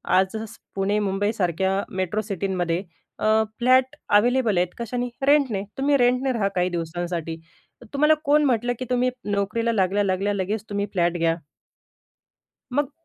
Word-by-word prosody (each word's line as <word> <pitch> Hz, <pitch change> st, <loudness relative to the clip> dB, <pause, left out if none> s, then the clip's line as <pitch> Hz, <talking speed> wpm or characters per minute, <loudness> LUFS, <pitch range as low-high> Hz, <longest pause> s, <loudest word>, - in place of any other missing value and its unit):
आज 190 Hz, +2 st, +2 dB
स् 220 Hz, -, -10 dB, 0.2 s
पुणे, 195 Hz, +2 st, +1 dB
मुंबईसारख्या 195 Hz, -3 st, 0 dB, 0.3 s
मेट्रो 190 Hz, +3 st, 0 dB
सिटींमध्ये 185 Hz, -4 st, -1 dB, 0.4 s
अ, -, -, -2 dB, 0.3 s
फ्लॅट 255 Hz, +1 st, +4 dB, 0.2 s
अवेलेबल 235 Hz, -2 st, +2 dB
आहेत, 180 Hz, +1 st, +3 dB
कशाने 245 Hz, +1 st, -3 dB, 0.2 s
'रेंटने.' 275 Hz, -9 st, +3 dB
तुम्ही 280 Hz, +1 st, +3 dB
रेंटने 250 Hz, +1 st, +2 dB
राहा 215 Hz, -4 st, +1 dB
काही 180 Hz, 0 st, +2 dB
दिवसांसाठी. 170 Hz, -1 st, -3 dB, 0.5 s
तर -, -, -12 dB
तुम्हाला 300 Hz, +2 st, +4 dB
कोण 295 Hz, +1 st, +4 dB
म्हटलं, 245 Hz, -2 st, +1 dB
की 255 Hz, -, -3 dB
तुम्ही 250 Hz, 0 st, +2 dB, 0.2 s
नोकरीला 210 Hz, +4 st, 0 dB
लागल्या, 200 Hz, -1 st, +1 dB
लागल्या 195 Hz, +1 st, 0 dB
लगेच 200 Hz, +2 st, -2 dB
तुम्ही 200 Hz, 0 st, -1 dB
फ्लॅट 175 Hz, -2 st, +1 dB
घ्या. 165 Hz, -1 st, +2 dB, 1.4 s
मग 285 Hz, +1 st, 0 dB
205 Hz, 145 wpm, -24 LUFS, 185-245 Hz, 1.4 s, फ्लॅट